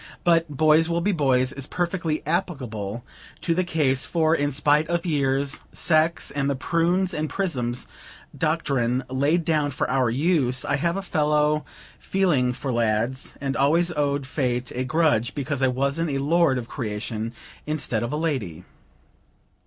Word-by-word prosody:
But 165 Hz, -1 st, +3 dB
"boys 155 Hz, +3 st, +3 dB
will 170 Hz, 0 st, +1 dB
be 205 Hz, +4 st, +1 dB
boys," 130 Hz, -6 st, +2 dB
is 140 Hz, -2 st, -3 dB
perfectly 170 Hz, -3 st, -2 dB
applicable 120 Hz, -, -3 dB, 0.4 s
to 170 Hz, -, +1 dB
the 185 Hz, +2 st, +1 dB
case; 145 Hz, -6 st, +1 dB
for, 160 Hz, -1 st, +2 dB
in 145 Hz, -2 st, +1 dB
spite 150 Hz, +2 st, +2 dB
of 170 Hz, 0 st, -1 dB
years, 140 Hz, -3 st, 0 dB
sex, 160 Hz, 0 st, +2 dB
and 140 Hz, 0 st, -1 dB
the 140 Hz, -, 0 dB
"prunes 175 Hz, +6 st, +1 dB
and 155 Hz, -1 st, -2 dB
prisms" 125 Hz, -11 st, -2 dB, 0.5 s
doctrine 135 Hz, -6 st, 0 dB
laid 145 Hz, +6 st, +1 dB
down 155 Hz, -3 st, +1 dB
for 130 Hz, -, -2 dB
our 130 Hz, -3 st, +2 dB
use, 135 Hz, -1 st, +1 dB
I -, -, +1 dB
have 170 Hz, +5 st, 0 dB
a 195 Hz, -, -3 dB
fellow 150 Hz, -3 st, +1 dB, 0.3 s
feeling 165 Hz, -10 st, +1 dB
for 130 Hz, +1 st, -4 dB
lads, 115 Hz, +3 st, 0 dB
and 135 Hz, 0 st, -2 dB
always 165 Hz, +5 st, +3 dB
owed 145 Hz, -3 st, -1 dB
Fate 125 Hz, -2 st, -2 dB
a 125 Hz, -, -2 dB
grudge 135 Hz, -5 st, +1 dB
because 140 Hz, -1 st, -2 dB
I 130 Hz, -, +4 dB
wasn't 140 Hz, +6 st, 0 dB
a 140 Hz, -, -1 dB
lord 150 Hz, 0 st, +2 dB
of 120 Hz, -2 st, -5 dB
creation 110 Hz, -2 st, -4 dB, 0.4 s
instead 145 Hz, -7 st, -1 dB
of 120 Hz, -, -3 dB
a 150 Hz, -, -1 dB
lady. 120 Hz, -, -2 dB
145 Hz, 160 wpm, -24 LUFS, 130-165 Hz, 0.5 s, I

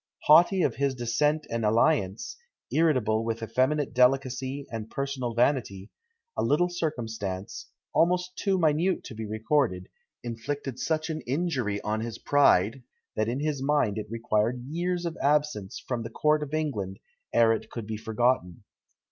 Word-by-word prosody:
Haughty 175 Hz, +4 st, +6 dB
of -, -, 0 dB
his 140 Hz, -1 st, 0 dB
descent 150 Hz, +6 st, 0 dB
and 115 Hz, 0 st, -1 dB
alliance, 110 Hz, -2 st, +1 dB, 0.4 s
irritable 125 Hz, -9 st, +2 dB
with 115 Hz, 0 st, -3 dB
effeminate 130 Hz, +6 st, 0 dB
delicacy 130 Hz, +2 st, +1 dB
and 110 Hz, -1 st, -5 dB
personal 135 Hz, -4 st, -3 dB
vanity, 115 Hz, -6 st, 0 dB, 0.4 s
a -, -, -1 dB
little 175 Hz, +5 st, +2 dB
circumstance, 110 Hz, -, -4 dB, 0.3 s
almost 180 Hz, +2 st, +2 dB
too 195 Hz, -1 st, 0 dB
minute 165 Hz, +2 st, +2 dB
to -, -, -9 dB
be 110 Hz, 0 st, -6 dB
recorded, 110 Hz, -3 st, 0 dB, 0.3 s
inflicted 125 Hz, +3 st, -4 dB
such 160 Hz, 0 st, -1 dB
an 155 Hz, 0 st, -4 dB
injury 130 Hz, -, -1 dB
on 110 Hz, +1 st, -1 dB
his 115 Hz, 0 st, -5 dB
pride, 130 Hz, -5 st, +3 dB, 0.3 s
that 110 Hz, +1 st, 0 dB
in 130 Hz, +4 st, -2 dB
his 150 Hz, -3 st, -1 dB
mind 135 Hz, -7 st, +1 dB
it 105 Hz, -, -7 dB
required 115 Hz, +1 st, -1 dB
years 175 Hz, +3 st, -2 dB
of 170 Hz, -1 st, -3 dB
absence 145 Hz, -9 st, 0 dB
from 125 Hz, -2 st, -2 dB
the 115 Hz, -, -5 dB
court 150 Hz, +6 st, +2 dB
of 145 Hz, -2 st, -5 dB
England 105 Hz, -12 st, -2 dB, 0.3 s
ere 115 Hz, -1 st, +5 dB
it 110 Hz, -, -5 dB
could 115 Hz, -3 st, -6 dB
be 110 Hz, +1 st, -4 dB
forgotten. 110 Hz, -5 st, 0 dB
125 Hz, 150 wpm, -27 LUFS, 110-150 Hz, 0.4 s, Haughty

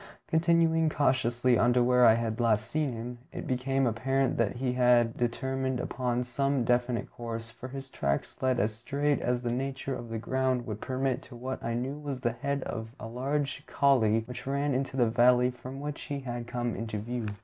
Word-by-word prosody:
Continuing 165 Hz, -1 st, +3 dB
cautiously 125 Hz, -4 st, +2 dB
on 120 Hz, +1 st, +4 dB
to 125 Hz, 0 st, +4 dB
where 125 Hz, 0 st, +5 dB
I 110 Hz, -, +7 dB
had 115 Hz, -1 st, -2 dB
last 110 Hz, -2 st, +2 dB
seen 150 Hz, +3 st, -1 dB
him, 120 Hz, +1 st, -6 dB
it -, -, -6 dB
became 135 Hz, +1 st, 0 dB
apparent 135 Hz, +3 st, +1 dB
that 115 Hz, -1 st, +1 dB
he 125 Hz, 0 st, -1 dB
had 120 Hz, -2 st, +4 dB
determined 130 Hz, +1 st, -1 dB
upon 125 Hz, -1 st, -1 dB
some 135 Hz, +1 st, 0 dB
definite 120 Hz, 0 st, 0 dB
course, 115 Hz, -1 st, -6 dB
for 125 Hz, +3 st, -9 dB
his 135 Hz, 0 st, -8 dB
tracks 70 Hz, 0 st, -2 dB
led 130 Hz, -2 st, +2 dB
as 105 Hz, +2 st, +1 dB
straight 140 Hz, +5 st, 0 dB
as 125 Hz, 0 st, 0 dB
the 120 Hz, -, -1 dB
nature 135 Hz, +2 st, -2 dB
of 120 Hz, -2 st, -6 dB
the 115 Hz, -, -3 dB
ground 130 Hz, +1 st, 0 dB
would 105 Hz, -1 st, -5 dB
permit 130 Hz, 0 st, -1 dB
to 125 Hz, -, -13 dB
what 130 Hz, +2 st, -5 dB
I 115 Hz, 0 st, -1 dB
knew 135 Hz, +5 st, -3 dB
was 140 Hz, -4 st, -5 dB
the 120 Hz, -, +1 dB
head 140 Hz, +3 st, -2 dB
of 115 Hz, +1 st, -6 dB
a -, -, -6 dB
large 135 Hz, +4 st, -2 dB
coulée 115 Hz, -5 st, +3 dB
which 125 Hz, +1 st, -8 dB
ran 140 Hz, +1 st, 0 dB
into 135 Hz, +1 st, -2 dB
the 125 Hz, -, +5 dB
valley 125 Hz, +2 st, +4 dB
from 130 Hz, +2 st, -8 dB
which 145 Hz, 0 st, -5 dB
he 140 Hz, -1 st, -4 dB
had 120 Hz, -2 st, -5 dB
come 120 Hz, -1 st, -2 dB
into 110 Hz, -2 st, -4 dB
view. 115 Hz, +2 st, -3 dB
125 Hz, 200 wpm, -29 LUFS, 120-135 Hz, -, I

